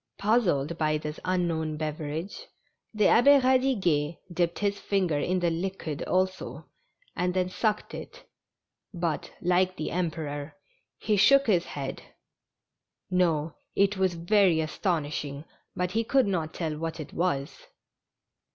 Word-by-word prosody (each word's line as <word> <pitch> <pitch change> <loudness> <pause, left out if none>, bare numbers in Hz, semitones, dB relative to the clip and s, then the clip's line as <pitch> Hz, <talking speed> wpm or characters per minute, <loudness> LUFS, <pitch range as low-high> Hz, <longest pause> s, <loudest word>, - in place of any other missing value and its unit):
Puzzled 175 - +1
by 155 -1 +2
this 150 0 -6
unknown 165 -4 -1
beverage, 155 +3 -4 0.4
the 215 -1 0
Abbd 275 +5 +6
Eadiguet 200 - +2 0.2
dipped 170 0 0
his 200 -1 -1
finger 185 -7 0
in 185 +5 0
the 170 -1 +2
liquid 170 -3 -4
also, 185 0 -1 0.5
and 180 0 -1
then 185 -1 +1
sucked 215 +2 -1
it, - - -9 0.7
but, 170 -3 -2
like 180 +1 +2
the 155 - -3
Emperor, 155 -4 -3 0.4
he 210 +6 0
shook 275 +8 +6
his 180 -6 +2
head; 140 -2 -5 1.1
no, 165 -4 +1 0.2
it 200 +1 +3
was 190 -2 +1
very 175 0 +3
astonishing, 155 -3 -2 0.3
but 180 0 -1
he 225 +3 +1
could 265 +2 +3
not 170 -6 -1
tell 160 -3 -3
what 165 0 -4
it 155 - -7
was. 145 -6 -2
175 Hz, 130 wpm, -27 LUFS, 155-195 Hz, 1.1 s, Abbd